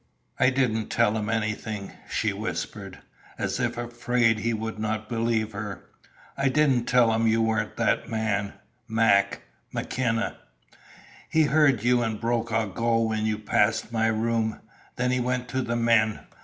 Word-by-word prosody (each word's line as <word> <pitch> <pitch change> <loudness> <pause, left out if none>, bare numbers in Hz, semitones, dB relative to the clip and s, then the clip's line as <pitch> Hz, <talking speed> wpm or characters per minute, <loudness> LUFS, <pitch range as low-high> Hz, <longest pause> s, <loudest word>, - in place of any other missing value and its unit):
"I - - +5
didn't 125 -5 0
tell 105 - +2
him 105 -1 -2
anything," 110 -2 -2 0.2
she - - 0
whispered, - - -5 0.4
as - - -2
if 120 -1 -1
afraid 120 -1 +1
he 115 +2 0
would 110 -1 -4
not 110 0 -2
believe 115 -2 0
her. 100 -1 -6 0.5
"I 140 -1 +1
didn't 135 -4 +2
tell 120 -3 +4
him 115 0 +2
you 110 +1 +3
weren't 110 0 -1
that - - +1
man 105 -3 -1 0.3
Mac 110 -3 +2 0.3
McKenna. 115 -3 -1 0.9
He 160 - +4
heard 145 -6 +3
you 120 0 +3
and 110 -2 -2
Brokaw 115 -3 -1
go 115 +1 +1
when 110 -1 0
you 110 -1 0
passed 110 +1 +1
my 110 -1 +1
room. 110 0 0 0.4
Then 125 0 0
he 125 - +1
went 125 0 -1
to 130 - -1
the 120 -1 -2
men. 115 -2 +2
115 Hz, 155 wpm, -26 LUFS, 110-120 Hz, 0.9 s, I